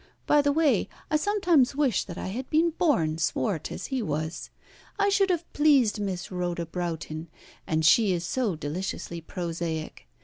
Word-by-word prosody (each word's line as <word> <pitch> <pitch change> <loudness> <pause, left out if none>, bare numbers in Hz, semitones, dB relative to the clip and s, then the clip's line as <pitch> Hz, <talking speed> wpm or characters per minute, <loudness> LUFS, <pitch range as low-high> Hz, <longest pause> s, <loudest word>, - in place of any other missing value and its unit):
By 295 - +5
the 285 0 +2
way, 310 -1 +2 0.2
I - - +3
sometimes 340 -8 +2
wish 280 -4 +1
that 175 -2 -8
I - - -4
had 250 +7 -5
been 330 +2 +3
born 240 - +1
swart 165 +2 -1
as - - -5
he 260 - 0
was. 155 -3 -3 0.5
I 405 0 +3
should 395 -1 +3
have 345 -2 -2
pleased 275 -8 +4
Miss 195 -3 -3
Rhoda 175 -2 -2
Broughton, 165 -2 -4 0.4
and 160 -1 +1
she 210 +5 +5
is 175 -2 -1
so 220 -1 0
deliciously 170 +2 -4
prosaic. 165 - -5
195 Hz, 165 wpm, -27 LUFS, -, 0.5 s, By